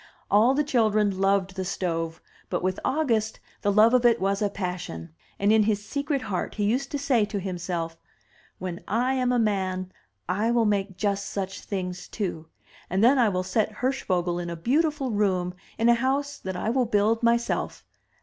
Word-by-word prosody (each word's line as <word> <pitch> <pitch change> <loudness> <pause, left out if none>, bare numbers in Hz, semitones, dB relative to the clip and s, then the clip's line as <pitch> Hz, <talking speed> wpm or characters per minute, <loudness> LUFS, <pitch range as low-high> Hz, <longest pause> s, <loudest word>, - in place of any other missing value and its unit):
All 225 +6 +5
the 300 - +2
children 215 -7 +2
loved 195 -1 +2
the 190 - -2
stove, 165 -3 -3 0.3
but - - -2
with 185 0 0
August 235 -7 0 0.2
the 205 - +2
love 215 +3 +5
of 250 -1 +4
it 235 -1 +4
was 195 +1 0
a 205 - +2
passion; 180 -4 -5 0.2
and 200 +1 +2
in 220 0 +5
his 210 -1 0
secret 280 0 -2
heart 185 -3 -3
he 210 - -1
used 250 +7 0
to 290 - -2
say 275 -5 +2
to 205 -1 -4
himself, 175 -3 -4 0.6
"When 180 -1 -5
I 245 +5 +1
am 255 -1 +1
a 250 - +2
man, 190 -4 0 0.4
I 205 +6 0
will 235 -1 +3
make 200 -2 0
just 200 0 -1
such 195 -1 -4
things 180 -2 -4
too, 175 -7 -4 0.4
and 190 +4 +1
then 260 +3 +6
I 235 -3 +5
will 185 -2 -1
set 215 +3 0
Hirsch 265 +4 -1
vogel 175 -2 0
in 175 -1 -4
a 170 - -4
beautiful 280 - 0
room 185 -4 0 0.2
in 230 - +2
a 235 - +7
house 275 +4 -1
that 190 -1 -5
I 215 +5 -1
will 255 0 +2
build 215 +1 +2
myself. 235 0 0
205 Hz, 190 wpm, -26 LUFS, 185-235 Hz, 0.6 s, a